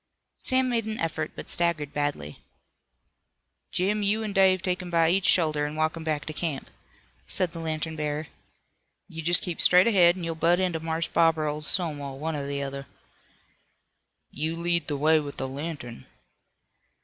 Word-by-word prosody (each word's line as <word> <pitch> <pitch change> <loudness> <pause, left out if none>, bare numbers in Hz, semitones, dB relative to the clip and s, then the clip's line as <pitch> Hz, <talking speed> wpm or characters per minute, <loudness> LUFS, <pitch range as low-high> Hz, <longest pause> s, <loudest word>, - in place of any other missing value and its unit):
Sam 260 0 +3
made 235 -3 0
an 220 0 -4
effort, 165 -1 -3
but - - -8
staggered 170 -4 +1
badly. 145 - -3 1.3
"Jim, 205 +4 0
you 210 +2 +1
an' 210 -2 -4
Dave 190 -2 +4
take 185 -1 -1
him 180 - -7
by 165 -1 +3
each 190 0 +1
shoulder 155 -4 +3
an' 150 - -7
walk 155 +1 0
him 165 - -7
back 155 -2 -2
to 155 - -5
camp," 155 -3 -4 0.6
said 185 -3 -1
the 165 - -7
lantern 160 0 -3
bearer. 150 0 -3 0.8
"You 165 - -7
jest 175 +2 +5
keep 175 -2 -3
straight 180 +1 +6
ahead 180 -6 +5
an' 180 - -6
you'll 165 0 -2
butt 170 +2 +2
into 180 -3 0
Marse 160 +1 -2
Bob 165 -1 +3
or 155 - -1
old 150 0 -3
Stonewall, 145 -6 -2
one 160 +2 -3
or 140 -1 -4
the 140 0 -3
other." 140 0 -6 1.4
"You 160 +4 -3
lead 170 -1 0
the 145 - -2
way 155 +2 +4
with 145 -1 -7
the 130 - -3
lantern." 135 -3 -7
160 Hz, 180 wpm, -26 LUFS, 150-180 Hz, 1.4 s, straight